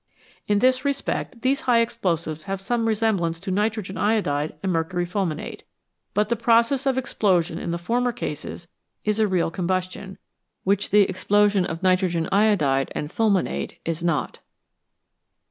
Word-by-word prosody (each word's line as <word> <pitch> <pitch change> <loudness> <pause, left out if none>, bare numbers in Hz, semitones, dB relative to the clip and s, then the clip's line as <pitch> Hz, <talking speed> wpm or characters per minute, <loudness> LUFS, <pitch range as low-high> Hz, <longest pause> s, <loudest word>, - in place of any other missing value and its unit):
In 205 - +3
this 255 +4 +3
respect 275 -3 -2
these 275 +3 +2
high 235 -1 +6
explosives 170 -9 -1
have 195 0 -3
some 230 +3 -1
resemblance 205 -7 0
to 195 - -4
nitrogen 205 -1 -1
iodide 155 -9 0
and 190 - 0
mercury 175 +1 -1
fulminate, 175 -4 -3 0.5
but 210 +1 +2
the 235 - +1
process 235 +4 +3
of 265 -1 +2
explosion 180 -9 +1
in - - -4
the 170 - -1
former 240 +8 0
cases 170 -6 -6 0.4
is 210 0 +1
a 215 - +4
real 180 -4 0
combustion, 185 +2 -3 0.5
which 200 +1 +1
the 210 - +6
explosion 200 +1 +2
of 165 +3 -6
nitrogen 185 -3 +2
iodide 185 -11 +2
and 150 - -4
fulminate 210 -5 0
is 165 0 -2
not. 170 -4 -1
195 Hz, 145 wpm, -24 LUFS, 170-225 Hz, 0.5 s, high